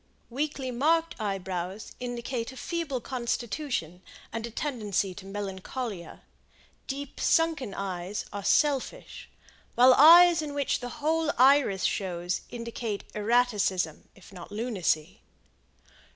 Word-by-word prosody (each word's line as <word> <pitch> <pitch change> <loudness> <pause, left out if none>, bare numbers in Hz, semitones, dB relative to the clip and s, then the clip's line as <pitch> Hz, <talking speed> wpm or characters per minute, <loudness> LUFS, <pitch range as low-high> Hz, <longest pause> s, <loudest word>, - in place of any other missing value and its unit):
Weakly 275 0 -2
marked 325 +6 +2
eyebrows 190 -1 -4
indicate 245 0 -4
a 260 - -12
feeble 310 -5 -3
constitution 240 - -3 0.3
and 230 +1 -3
a - - -8
tendency 215 - -2
to 195 +1 -11
melancholia, 200 0 -6 0.6
Deep 280 +1 -6
sunken 320 -10 +1
eyes 190 0 -4
are 200 -1 -5
selfish, 295 - 0 0.5
while 255 +1 +7
eyes 335 +4 +8
in 295 -2 -5
which 280 -2 0
the 245 - -6 0.2
whole 320 -1 +2
iris 260 -7 +4
shows 180 -2 -1
indicate 230 -3 -5
erraticism, 210 -7 +1
if 195 0 -16
not 180 +1 -10
lunacy. 195 -6 -1
235 Hz, 110 wpm, -28 LUFS, 195-275 Hz, 0.6 s, eyes